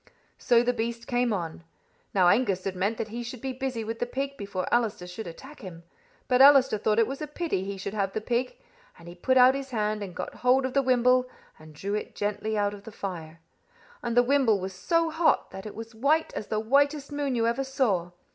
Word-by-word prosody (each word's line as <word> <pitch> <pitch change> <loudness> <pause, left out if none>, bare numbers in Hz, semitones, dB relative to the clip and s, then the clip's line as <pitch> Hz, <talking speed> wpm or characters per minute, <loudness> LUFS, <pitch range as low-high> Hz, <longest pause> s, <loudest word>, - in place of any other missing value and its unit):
So 235 -1 +4
the 245 +1 +1
beast 235 0 -3
came 245 -1 +1
on. 170 -5 -4 0.5
Now 185 -3 +4
Angus 195 -2 +2
had 195 -1 -3
meant 200 +5 -1
that 215 - -4
he 235 +3 -5
should 240 +1 -7
be 265 +2 -4
busy 255 -3 -3
with 225 +1 -5
the 245 - -1
pig 275 +2 -3
before 200 -5 -4
Allister 225 -6 +1
should 180 +3 -7
attack 265 - -11
him; 180 -7 -10 0.4
but 250 0 +4
Allister 270 -5 +7
thought 210 +1 +1
it 230 - +5
was 270 +4 -6
a 305 - -3
pity 300 - -2
he 195 0 -5
should 195 +1 -5
have 195 -2 -1
the - - -1
pig, 240 +3 -2 0.4
and 170 - -14
he 175 - -8
put 260 +9 +1
out 255 +1 +7
his 275 0 -5
hand 215 -3 -1
and 190 -3 -6
got - - -5
hold 255 +1 +2
of 260 - -3
the 275 - +3
wimble, 255 0 +3 0.3
and 155 -1 -14
drew 200 +6 -4
it 210 - -4
gently 210 +1 -2
out 205 0 +1
of 205 - -10
the 225 - -10
fire. 165 -5 -7 0.6
And 235 0 -2
the 245 - +7
wimble 250 -5 +3
was 190 +1 -5
so 330 - +1
hot 320 +1 +2
that 190 +2 -8
it 210 - -9
was 225 0 -7
as - - -20
white 285 +8 +1
as 210 - -5
the 215 - -1
whitest 280 +5 +1
moon 285 -3 -1
you 230 -1 +1
ever 235 +4 0
saw. 240 - 0
230 Hz, 235 wpm, -27 LUFS, 200-260 Hz, 0.6 s, Allister